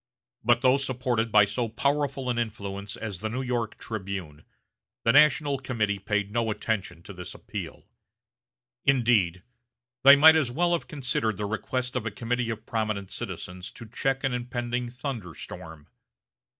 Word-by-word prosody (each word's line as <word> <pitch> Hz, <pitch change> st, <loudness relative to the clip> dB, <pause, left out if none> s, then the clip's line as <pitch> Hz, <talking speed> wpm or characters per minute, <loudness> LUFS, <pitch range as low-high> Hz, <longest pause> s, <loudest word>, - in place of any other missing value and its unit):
But 120 Hz, 0 st, +4 dB
though 130 Hz, +1 st, +5 dB
supported 125 Hz, -4 st, -1 dB
by 105 Hz, -1 st, +7 dB
so 110 Hz, +4 st, -2 dB
powerful 140 Hz, +2 st, 0 dB
an 120 Hz, -, -1 dB
influence 100 Hz, -3 st, -4 dB
as 105 Hz, -6 st, -5 dB
the 110 Hz, -, -3 dB
New 130 Hz, +4 st, -3 dB
York 120 Hz, -3 st, -2 dB
"Tribune," 95 Hz, -8 st, -6 dB, 0.6 s
the 115 Hz, -, +5 dB
National 145 Hz, 0 st, +5 dB
Committee 110 Hz, -6 st, -1 dB
paid 105 Hz, 0 st, -1 dB
no 115 Hz, 0 st, 0 dB
attention 100 Hz, -6 st, -2 dB
to 100 Hz, -, -9 dB
this 90 Hz, -1 st, -8 dB
appeal. -, -, -7 dB, 1.0 s
Indeed, 115 Hz, -10 st, +3 dB, 0.6 s
they 140 Hz, +1 st, +10 dB
might 160 Hz, +3 st, +8 dB
as 155 Hz, -6 st, +2 dB
well 170 Hz, +8 st, +1 dB
have 170 Hz, -, -1 dB
considered 125 Hz, -, -1 dB
the 105 Hz, -, -2 dB
request 125 Hz, +4 st, -2 dB
of 120 Hz, -3 st, -1 dB
a -, -, +1 dB
committee 120 Hz, +2 st, -2 dB
of 110 Hz, 0 st, -5 dB
prominent 110 Hz, -4 st, -2 dB
citizens 90 Hz, 0 st, -6 dB
to 115 Hz, -, -9 dB
check 135 Hz, +4 st, -1 dB
an 135 Hz, -2 st, +1 dB
impending 120 Hz, 0 st, -2 dB
thunderstorm. 90 Hz, -, -7 dB
Mr. -, -, -35 dB
115 Hz, 155 wpm, -27 LUFS, 105-130 Hz, 1.0 s, they